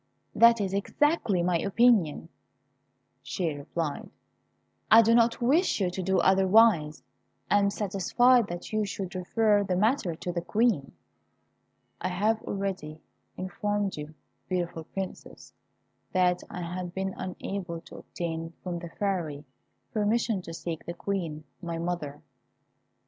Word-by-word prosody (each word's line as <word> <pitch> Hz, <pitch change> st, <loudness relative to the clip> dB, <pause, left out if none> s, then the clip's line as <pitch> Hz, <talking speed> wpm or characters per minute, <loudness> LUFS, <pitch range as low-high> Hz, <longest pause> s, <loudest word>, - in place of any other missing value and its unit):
"That 235 Hz, 0 st, +6 dB
is 195 Hz, -2 st, -1 dB
exactly 205 Hz, -, +1 dB
my 175 Hz, -1 st, +2 dB
opinion," 200 Hz, -7 st, +3 dB, 0.9 s
she 165 Hz, +3 st, -2 dB
replied; 145 Hz, +1 st, -4 dB, 0.8 s
"I 225 Hz, +2 st, +9 dB
do 225 Hz, +1 st, +4 dB
not 230 Hz, 0 st, +4 dB
wish 295 Hz, -, +3 dB
you 185 Hz, -3 st, +1 dB
to 190 Hz, -, -4 dB
do 190 Hz, +1 st, +1 dB
otherwise; 190 Hz, -5 st, +4 dB, 0.5 s
I 205 Hz, -, +6 dB
am 200 Hz, 0 st, +3 dB
satisfied 210 Hz, +4 st, +3 dB
that 175 Hz, +4 st, -7 dB
you 215 Hz, 0 st, +2 dB
should 195 Hz, -2 st, -5 dB
refer 205 Hz, +3 st, +2 dB
the 190 Hz, -2 st, -1 dB
matter 210 Hz, -, +1 dB
to 175 Hz, +2 st, -4 dB
the 170 Hz, 0 st, -2 dB
Queen." 205 Hz, -, +1 dB, 1.1 s
I 185 Hz, -, -1 dB
have 210 Hz, +5 st, +1 dB
already 190 Hz, -8 st, -4 dB, 0.4 s
informed 200 Hz, +2 st, -2 dB
you, 150 Hz, +1 st, -8 dB, 0.3 s
beautiful 175 Hz, -3 st, -2 dB
Princess, 190 Hz, +2 st, -7 dB, 0.6 s
that 180 Hz, -1 st, +2 dB
I 180 Hz, -, -5 dB
had 180 Hz, +1 st, -5 dB
been 190 Hz, 0 st, -2 dB
unable 185 Hz, -2 st, -5 dB
to -, -, -13 dB
obtain 165 Hz, -1 st, -5 dB
from 175 Hz, -2 st, -3 dB
the 170 Hz, -1 st, -8 dB
Fairy 165 Hz, -7 st, -3 dB, 0.5 s
permission 215 Hz, -1 st, +1 dB
to 165 Hz, -, -9 dB
seek 165 Hz, -1 st, -5 dB
the 170 Hz, -, -6 dB
Queen, 170 Hz, -5 st, -3 dB, 0.2 s
my 170 Hz, -2 st, -4 dB
mother. 165 Hz, -4 st, -4 dB
185 Hz, 135 wpm, -28 LUFS, 170-205 Hz, 1.1 s, I